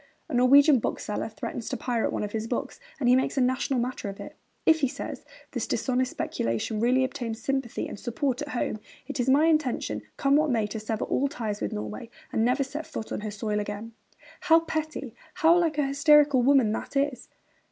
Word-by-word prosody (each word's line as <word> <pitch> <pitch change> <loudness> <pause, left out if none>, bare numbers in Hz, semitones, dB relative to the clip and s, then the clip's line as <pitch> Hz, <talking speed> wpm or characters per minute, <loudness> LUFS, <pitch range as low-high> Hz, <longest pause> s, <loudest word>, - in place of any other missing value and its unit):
A - - -6
Norwegian 270 +3 +6
bookseller 210 0 -3
threatens 225 +1 -6
to - - -2
pirate 240 -3 -1
one - - -2
of 205 - -4
his 220 +1 -3
books, 240 - -3 0.2
and 255 - 0
he 250 - +6
makes 260 +2 0
a - - +4
national 255 +1 +1
matter 245 -4 -3
of 195 - -9
it. - - -9 0.3
'If,' 320 0 +5
he 275 - +2
says, - - -6 0.3
'this - - -3
dishonest 255 -1 0
speculation 115 - -2
really 250 +3 +3
obtains 245 -4 -3
sympathy 270 -1 -2
and - - -8
support 260 +2 -2
at 295 - -4
home, 240 -5 -2 0.3
it 285 +1 -6
is 250 +1 +1
my 285 +4 +5
intention, 275 - +1 0.2
come 275 0 +3
what 305 0 +2
may, 225 -4 +1
to 215 +2 -5
sever 215 0 -3
all 280 - +1
ties 220 -6 -4
with 100 - -2
Norway 105 - -5 0.2
and 220 - +2
never 250 +4 +2
set 295 +4 -6
foot 220 - -6
on - - -3
her 215 - -4
soil 210 0 -2
again.' 205 +2 -5 0.5
How 330 -3 +5
petty, 310 -6 -4 0.2
how 335 -1 +5
like 330 -3 +1
a 295 - +2
hysterical 285 -1 +5
woman 260 -4 +4
that 220 - -5
is! 275 -2 -1
255 Hz, 205 wpm, -27 LUFS, 220-285 Hz, 0.5 s, Norwegian